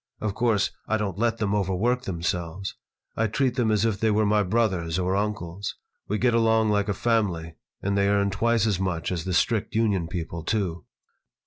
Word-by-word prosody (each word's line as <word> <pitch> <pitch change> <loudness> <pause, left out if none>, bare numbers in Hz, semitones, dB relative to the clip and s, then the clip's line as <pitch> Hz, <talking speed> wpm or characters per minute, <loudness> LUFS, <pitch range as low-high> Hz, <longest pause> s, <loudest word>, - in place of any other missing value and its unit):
Of 105 -2 -2
course, 110 -3 +1 0.2
I 110 - +1
don't 100 -3 -3
let 115 0 +1
them 105 -3 0
overwork 105 +6 0
themselves. 85 +1 -3 0.4
I 115 - +1
treat 130 +4 +1
them 120 -2 +1
as 105 0 +2
if 110 -3 0
they 110 - +2
were 110 0 +3
my 105 0 +3
brothers 95 -5 0
or 95 +1 0
uncles. 100 -2 -3 0.3
We 105 - 0
get 120 +2 +2
along 110 -1 +3
like 105 0 +1
a 100 - 0
family, 95 -9 0 0.3
and 100 0 0
they 100 0 +3
earn 100 -1 +2
twice 115 +2 +2
as 100 -4 +1
much 95 -3 -1
as 85 -3 -3
the 95 - -2
strict 110 +4 +1
union 100 -7 +1
people, 85 -1 -5
too." 90 -6 -2
100 Hz, 195 wpm, -25 LUFS, 90-110 Hz, 0.4 s, were